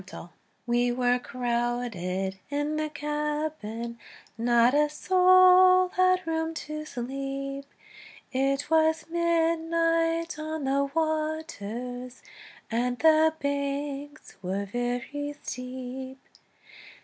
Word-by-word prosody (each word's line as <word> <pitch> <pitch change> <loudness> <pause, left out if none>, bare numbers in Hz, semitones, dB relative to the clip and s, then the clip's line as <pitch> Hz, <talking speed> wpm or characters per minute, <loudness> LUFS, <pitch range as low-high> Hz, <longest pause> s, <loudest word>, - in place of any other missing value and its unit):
Field] 175 - -9 0.4
WE 240 0 +2
were 245 0 +2
crowded 235 -7 -2
in 290 +1 -1
the 310 0 -1
cabin, 295 -6 -3 0.4
Not 235 +1 +3
a 300 +1 +3
soul 370 +2 +6
had 370 0 +2
room 320 0 -2
to 305 0 -5
sleep; 275 +2 -5 0.7
It 275 +2 0
was 320 0 +3
midnight 330 0 +1
on 310 -1 -4
the 275 +1 +1
waters, 270 -6 -3 0.5
And 245 +2 0
the 315 +1 +4
banks 280 +1 -4
were 195 +2 -2
very 245 +6 -3
steep. 255 +1 -6
285 Hz, 90 wpm, -27 LUFS, 245-315 Hz, 0.7 s, soul